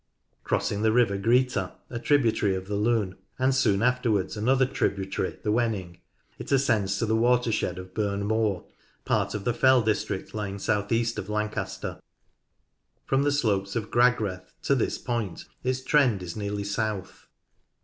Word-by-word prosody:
Crossing 105 - -1
the 110 0 +3
river 115 -4 +3
Greeta, 115 -1 +1 0.2
a 120 - -3
tributary 115 -8 +2
of 95 0 -5
the 105 - -4
Lune, 105 -3 0 0.2
and 130 +1 +2
soon 110 -5 +2
afterwards 120 -6 +1
another 130 +5 +3
tributary, 95 -6 -2
the 105 - +1
Wenning, 105 -7 -1 0.4
it - - -7
ascends 110 -8 +2
to 115 - 0
the 110 0 +1
water 120 +1 +3
shed 95 -4 -1
of 95 0 -9
Burn 100 -1 -1
Moor, 105 -4 0 0.4
part - - 0
of 105 - -4
the 120 - +1
fell 130 0 +4
district 105 -3 -2
lying 105 -2 -4
south 105 0 -1
east 115 0 +1
of 95 - -6
Lancaster. 105 0 -3 1.0
From 135 0 +2
the 145 0 +2
slopes 100 -8 0
of 110 -2 -3
Gragreth 110 -7 +1
to 140 - +2
this 130 - 0
point 115 -8 -3 0.2
its 130 +1 -1
trend 130 -9 +3
is 85 -1 -6
nearly 100 -1 -3
south. 100 -2 -3
110 Hz, 160 wpm, -26 LUFS, 100-120 Hz, 1.0 s, fell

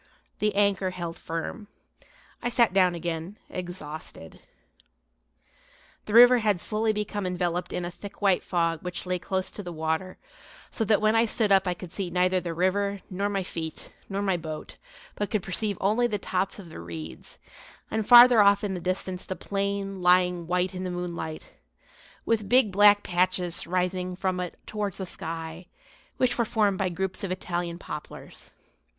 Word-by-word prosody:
The 210 -1 +1
anchor 200 -2 +2
held 170 -2 -5
firm. 165 +6 -5 0.7
I 245 - -1
sat 235 -4 +3
down 185 -2 +4
again, 170 +3 -4
exhausted. 160 - -6 1.7
The 210 - -3
river 245 +1 +9
had 210 -5 +1
slowly 215 +3 +1
become 210 -2 -3
enveloped 180 -1 -2
in 180 - -3
a 175 - -4
thick 200 +3 -11
white 195 -3 +2
fog 165 -2 0
which 180 0 -5
lay 180 0 -1
close 190 +1 -2
to - - -7
the 180 -3 -7
water, 160 +3 -2 0.5
so 225 - -1
that 215 0 +3
when 215 +1 +3
I 230 +1 +4
stood 215 -1 +1
up 195 -1 +5
I 180 - 0
could 175 -1 -10
see 190 -3 -3
neither 185 +1 +2
the 170 -2 -5
river, 200 +3 0
nor 200 +2 -1
my 195 -2 -1
feet, 160 -3 -6 0.2
nor 200 +1 -2
my 190 -3 +1
boat; 155 -2 -7 0.4
but 205 - -3
could 215 -5 -1
perceive 200 +1 0
only 220 +5 +2
the 210 -3 -1
tops 190 0 -2
of 190 -5 -10
the - - -9
reeds, 80 -1 -8 0.5
and 220 0 0
farther 240 0 +9
off 200 0 +5
in 200 -2 -1
the 180 - -3
distance 185 +1 -3
the 185 - -3
plain, 195 -1 -3
lying 180 -1 +3
white 180 +1 0
in 185 0 -5
the 185 - -3
moonlight, 175 -3 -5 0.7
with 215 -3 0
big 250 -4 +5
black 205 +1 +6
patches 180 -1 0
rising 180 +1 -1
up - - -10
from 185 -1 -1
it 180 -1 -5
towards 210 -3 -3
the 190 - -4
sky, 165 0 -6 0.5
which 250 -1 +1
were - - +4
formed 210 -4 +1
by 190 -2 +1
groups 190 +2 -3
of 195 - -2
Italian 175 -2 -3
poplars. 150 -3 -9
185 Hz, 175 wpm, -27 LUFS, 175-205 Hz, 1.7 s, river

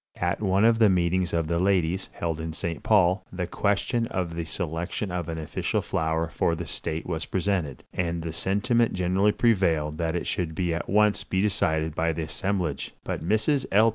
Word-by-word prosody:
At 90 +3 -1
one 100 +1 +3
of 115 0 +4
the 110 -2 +6
meetings 90 -1 +1
of 85 -1 0
the 85 +1 0
ladies, 95 -1 +1
held 80 -2 -3
in 80 0 -4
St. 85 0 -4
Paul, 95 -2 +3
the 90 -1 -3
question 105 +5 0
of 90 -5 -3
the 85 0 -3
selection 85 +4 -3
of 90 -1 -3
an 80 - -3
official 80 -2 -2
flower 80 +1 0
for 85 +1 0
the - - -5
state 80 +1 -4
was 80 -2 -3
presented, 90 -8 -1
and 85 -2 -1
the 80 -1 -4
sentiment 115 +7 +1
generally 95 +3 +2
prevailed 85 -10 +1
that 80 0 0
it 85 - -2
should 85 -2 -2
at 85 - -3
once 105 +1 +3
be 95 - -1
decided 80 -6 +1
by 80 +1 0
the 80 +1 -3
assemblage; 90 -2 -2
but - - -3
Mrs. 110 - +1
L. 110 +3 +6
90 Hz, 190 wpm, -26 LUFS, 80-100 Hz, -, the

